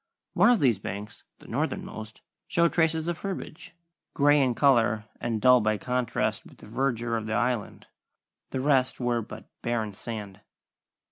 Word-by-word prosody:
One - - +5
of 245 -3 +4
these 120 -8 +3
banks 105 +1 -7
the - - -16
northernmost 110 0 -4 0.3
showed 170 -1 +2
traces 160 -1 +1
of 175 -1 -2
herbage, 190 -4 -6 0.4
grey 145 0 +5
in 125 -3 +1
colour 115 -6 +3
and 115 -2 -2
dull 125 +2 +6
by 110 0 +1
contrast 125 +1 -1
with - - -16
the - - -14
verdure 120 -3 -1
of 110 -1 -3
the 110 - -2
Island. 120 -1 -1 0.6
The 130 - -3
rest 130 -2 +2
were 120 -2 0
but 110 - -10
barren 115 -3 -2
sand. 105 -2 -7
120 Hz, 155 wpm, -27 LUFS, 110-140 Hz, 0.6 s, dull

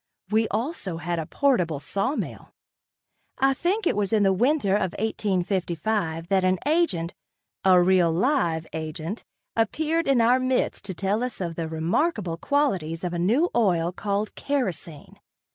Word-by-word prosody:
We 220 +1 +3
also 220 - -3
had 170 0 -2
a 160 - -4
portable 180 - +1
sawmill. 220 - -3 0.8
I 270 0 +3
think 375 +9 -1
it - - +2
was 205 0 0
in 215 -2 +3
the 195 -1 +4
winter 240 0 +2
of 195 -3 +1
1855 185 -4 -1
that 190 -1 +3
an 185 0 +3
agent, 290 - +1 0.5
a 185 -1 +6
real 180 -1 +4
live 170 - +1
agent, 160 +5 -5 0.3
appeared 315 +9 0
in 270 -3 +4
our 240 +3 +4
midst 255 -4 0
to 190 -2 -4
tell 200 +6 0
us 250 -2 -4
of 170 -3 -3
the 165 -1 -3
remarkable 170 - -1
qualities 185 - 0
of 175 -1 -2
a 175 - -2
new 240 - +2
oil 175 -7 +2
called 205 +2 -2
kerosene. 185 - -3
195 Hz, 150 wpm, -25 LUFS, 170-255 Hz, 0.8 s, a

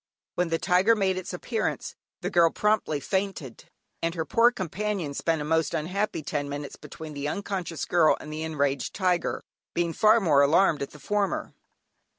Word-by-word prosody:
When 180 -1 0
the 165 - +1
tiger 190 +6 +3
made 190 -3 +1
its 185 - -5
appearance, 215 +5 -3 0.3
the - - -3
girl 170 -1 +5
promptly 210 -7 +1
fainted, 190 - -3 0.4
and 165 +1 -1
her 160 -2 -2
poor 230 +10 +5
companion 190 -5 -3
spent 160 +1 0
a - - -5
most 160 +1 +1
unhappy 180 +2 -2
ten 145 -1 -3
minutes 145 0 -5
between 160 -1 -9
the 145 0 -3
unconscious 185 -1 -3
girl 170 -3 +4
and 155 - -8
the 155 - -4
enraged 145 -4 -1
tiger, 180 -3 0 0.3
being 170 -1 0
far 215 +4 +5
more 155 -9 +4
alarmed 155 +2 +4
at 140 - -3
the 150 - -14
former. 205 +7 -1
170 Hz, 170 wpm, -27 LUFS, 150-195 Hz, 0.4 s, girl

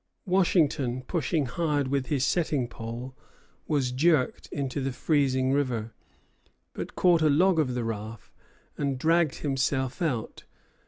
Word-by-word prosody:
Washington, 155 - +2
pushing 155 0 -1
hard 145 0 -1
with 135 -1 -1
his 135 -3 +1
setting 150 -7 0
pole, 120 +3 -7 0.5
was 140 -5 0
jerked 145 +1 +1
into 140 0 -3
the 135 0 -1
freezing 130 -2 +1
river; 120 -6 -1 0.8
but - - -6
caught 175 -3 +4
a 155 - +4
log 170 +4 +4
of 130 -5 0
the 120 - -1
raft, 110 0 -6 0.5
and 140 -2 -1
dragged 165 +1 +2
himself 135 -1 -1
out. 130 -10 -2
135 Hz, 130 wpm, -27 LUFS, 125-155 Hz, 0.8 s, caught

